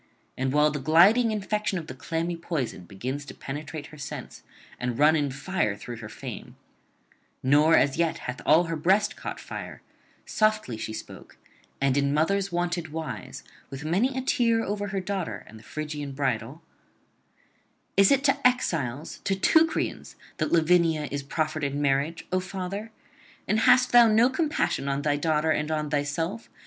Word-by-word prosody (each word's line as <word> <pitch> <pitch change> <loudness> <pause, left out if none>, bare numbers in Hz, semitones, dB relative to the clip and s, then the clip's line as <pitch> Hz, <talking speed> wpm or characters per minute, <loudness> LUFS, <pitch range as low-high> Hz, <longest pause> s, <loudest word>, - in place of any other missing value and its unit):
And 130 0 -1
while 150 +1 +4
the 145 - -3
gliding 180 - +5
infection 210 -1 -1
of 165 - -5
the 130 - -8
clammy 165 +6 -3
poison 155 - -4
begins 130 +10 -5
to - - -10
penetrate 145 +2 -6
her 155 - -12
sense 135 - -7 0.4
and 120 -1 -2
run 150 +3 +5
in 145 -2 +1
fire 135 - -1
through 120 +3 -8
her 110 -2 -8
frame, - - -8 0.9
nor 150 +5 +5
as 140 +1 +2
yet 165 -1 +1
hath 125 0 -5
all 160 +3 +5
her 165 -1 -3
breast 190 +6 +2
caught - - -6
fire, - - -8 0.4
softly 215 - +1
she 110 - -5
spoke 110 - -10 0.4
and 135 0 +2
in 140 0 +1
mothers' 195 +5 +1
wonted 175 -2 -2
wise, 160 -1 -6 0.3
with 135 +2 -7
many 225 - +1
a 260 - -2
tear 235 -4 +2
over 205 0 -3
her 195 -1 -2
daughter 190 -3 -4
and 110 - -13
the - - -17
Phrygian 150 -2 -5
bridal: 135 +2 -2 1.3
'Is 195 0 +6
it 275 0 +3
to 280 -2 +4
exiles, 155 - -2
to 195 - +1
Teucrians, 320 - +1 0.2
that - - -1
Lavinia 165 -2 +3
is 140 0 -2
proffered 155 +2 -2
in 140 0 -1
marriage, 145 +3 0
O 185 - +2
father? 190 +3 -5 0.6
and 215 - +2
hast 250 0 +5
thou 240 -1 +8
no 225 +4 +4
compassion 295 - 0
on 140 +1 -1
[361 145 -1 +2
392]thy - - -14
daughter 155 0 +2
and 150 0 0
on 155 -1 -2
thyself? 160 +9 -2
160 Hz, 170 wpm, -26 LUFS, 140-195 Hz, 1.3 s, thou